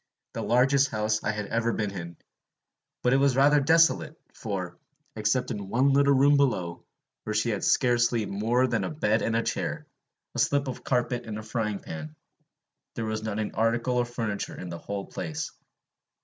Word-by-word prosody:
the - - -4
largest 135 +3 +3
house 110 0 -1
I - - 0
had 105 0 -2
ever 115 +2 0
been 105 -3 -2
in; 85 -3 -7 0.9
but 125 - +3
it - - +5
was 135 -2 +3
rather 145 +2 +5
desolate, 165 +2 +3
for, 95 -5 -4 0.4
except 110 +4 0
in 100 -2 -5
one 130 +5 +3
little 140 0 +4
room 140 +2 +5
below, 90 -12 0 0.4
where 110 - -3
she 110 +2 +1
had 105 - -3
scarcely 120 -3 +2
more 115 +6 +1
than - - 0
a - - -2
bed 110 -8 +1
and 115 - 0
a 115 - +1
chair, - - -3 0.5
a - - -4
slip 140 -1 +2
of 130 - -6
carpet 125 -1 -1
and 105 -1 -4
a 110 - -6
frying 110 -2 -2
pan, 80 -4 -8 0.8
there 115 - -3
was 110 0 -2
not 110 -1 -3
an 110 -1 -2
article 115 +3 +1
of 120 0 -1
furniture 110 -4 -4
in 90 - -6
the 85 0 -6
whole 100 -1 -5
place. 80 -2 -5
115 Hz, 185 wpm, -27 LUFS, 105-130 Hz, 0.9 s, it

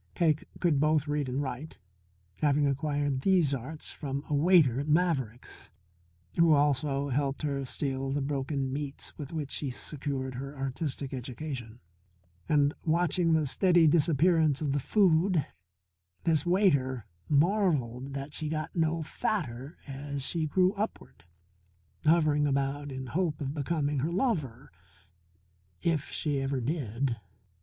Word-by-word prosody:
Cake 155 -4 +2
could 165 -6 +2
both 155 0 +2
read 145 -2 -1
and 135 +3 -1
write, 135 +3 -6 0.6
having 145 -1 +3
acquired 145 -1 0
these 175 -5 +3
arts 135 +5 -4
from 140 -1 -4
a - - -3
waiter 145 -5 +5
at 145 - -3
Maverick's, 150 -8 -1 0.7
who 165 -1 +6
also 145 -1 +2
helped 140 +2 -1
her 140 -2 -1
steal 135 0 -2
the 145 - 0
broken 135 -1 -2
meats 145 -1 -5
with 145 -2 -7
which 150 -4 -4
she 145 - -1
secured 130 0 -4
her 135 +3 -7
artistic 135 0 -3
education. 125 -2 -6 0.7
And, 145 -1 +3
watching 170 +1 +2
the 160 -1 +3
steady 175 +3 +4
disappearance 160 -1 +3
of 150 -3 -1
the 145 - +1
food, 175 -1 +3 0.8
this 160 -2 +2
waiter 140 - +2 0.2
marvelled 145 - +1
that 140 +2 -5
she 155 0 -3
got 155 0 -3
no 165 -1 +1
fatter 145 - -3
as 140 0 -5
she 160 +2 -1
grew 185 +4 +3
upward, 205 - -5 0.8
hovering 155 -2 +4
about 140 +1 -1
in 130 0 -5
hope 155 +3 -1
of 140 -2 -3
becoming 145 -1 -1
her 155 +6 -1
lover 155 - -1 1.1
if 165 -4 0
she 145 -3 -1
ever 135 0 -1
did. 125 -3 -1
145 Hz, 135 wpm, -29 LUFS, 135-160 Hz, 1.1 s, who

